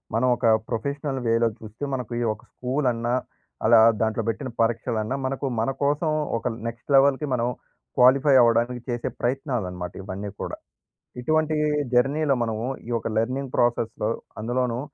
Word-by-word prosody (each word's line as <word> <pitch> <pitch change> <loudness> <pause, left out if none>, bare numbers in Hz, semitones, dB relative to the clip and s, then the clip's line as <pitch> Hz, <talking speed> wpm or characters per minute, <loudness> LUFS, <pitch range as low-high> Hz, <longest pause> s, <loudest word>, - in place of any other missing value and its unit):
మనం 125 +3 +2
ఒక 120 - -2 0.2
ప్రొఫెషనల్ 140 +3 -2
వేలో 115 0 +3
చూస్తే, 110 +5 -10
మనకు 125 -3 -3 0.2
ఒక 110 - -16
స్కూల్ 130 +2 -1
అన్నా, 120 +1 -2 0.5
అలా 115 0 +7 0.2
దాంట్లో 110 0 0
పెట్టిన 130 +3 -3
పరీక్షలన్నా, 115 +1 0
మనకు 135 +1 -2 0.2
మనకోసం 145 +5 0 0.3
ఒక - - -3 0.2
నెక్స్ట్ 120 +4 -4
లెవెల్‍‌కి 140 +2 +3
మనం 120 -1 +1 0.5
క్వాలిఫై 135 +2 +6
అవ్వడానికి 120 +1 +2
చేసే 120 -1 -2
ప్రయత్నాలన్నమాట, 110 - -2
ఇవన్నీ 100 +1 -5
కూడా. - - -5 0.6
ఇటువంటి 155 +3 +1 0.4
జర్నీలో 140 +3 +3
మనము 115 +1 -2 0.2
ఈ - - -5
యొక్క 115 - -1
లెర్నింగ్ 130 +3 -2
ప్రాసెస్‌లో, 115 -2 +1 0.3
అందులోనూ 120 +1 -1
120 Hz, 135 wpm, -25 LUFS, 115-135 Hz, 0.6 s, అలా